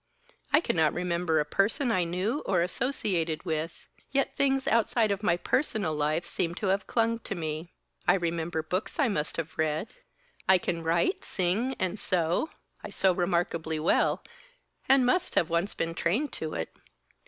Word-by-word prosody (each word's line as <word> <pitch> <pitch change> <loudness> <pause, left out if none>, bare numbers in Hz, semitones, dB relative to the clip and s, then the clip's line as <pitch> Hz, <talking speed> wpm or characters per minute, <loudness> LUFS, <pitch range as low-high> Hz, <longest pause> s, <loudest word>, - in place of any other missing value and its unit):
I 300 - +5
cannot 160 - +2
remember 175 -2 +1
a 150 - +1
person 215 - +1
I 185 -5 +2
knew 185 - -1
or 180 -3 +3
associated 180 - -1
with, 160 0 -3 0.2
yet 275 0 0
things 270 -1 +1
outside 225 -1 +3
of 200 0 -1
my 175 -5 +2
personal 210 - 0
life 155 +3 0
seem 170 0 -2
to 195 0 -1
have 195 0 -2
clung 230 0 +1
to 205 - -5
me. 160 0 -4 0.4
I - - +6
remembered 165 -2 -2
books 185 +5 -2
I 280 -6 +3
must 150 -7 -2
have 165 -1 -5
read; 155 +6 0 0.6
I 190 - +8
can 170 -1 -2
write, 170 - +1
sing 200 +9 0
and 185 +2 -1
sew 175 - +1 0.3
I - - -6
sew 190 -1 +2
remarkably 170 -3 0
well, 155 - +2 0.7
and 265 -1 +6
must 360 +9 +1
have 170 0 +2
once 170 +4 0
been 165 0 -2
trained 220 - 0
to 155 -1 -4
it. 80 - -4
175 Hz, 165 wpm, -28 LUFS, 165-220 Hz, 0.7 s, I